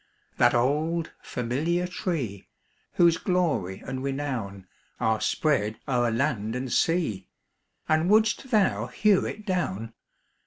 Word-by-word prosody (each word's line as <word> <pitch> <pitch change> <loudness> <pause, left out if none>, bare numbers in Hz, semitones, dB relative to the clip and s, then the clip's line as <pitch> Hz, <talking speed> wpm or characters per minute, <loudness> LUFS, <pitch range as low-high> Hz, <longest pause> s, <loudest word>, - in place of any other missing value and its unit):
That - - +4
old 155 +7 +1
familiar 150 +9 -1
tree, 155 - -3 0.5
Whose 170 -1 +4
glory 160 - 0
and 130 0 -4
renown 130 -9 -3 0.3
Are 110 -1 +1
spread 110 -9 +1
o'er 120 -3 +2
land 115 -3 -1
and 125 0 -3
sea 155 - +1 0.6
And 155 +3 +2
wouldst 220 +5 +3
thou 155 - +2
hew 195 - +2
it 215 - -7
down? 115 - -2
140 Hz, 115 wpm, -26 LUFS, 115-170 Hz, 0.6 s, That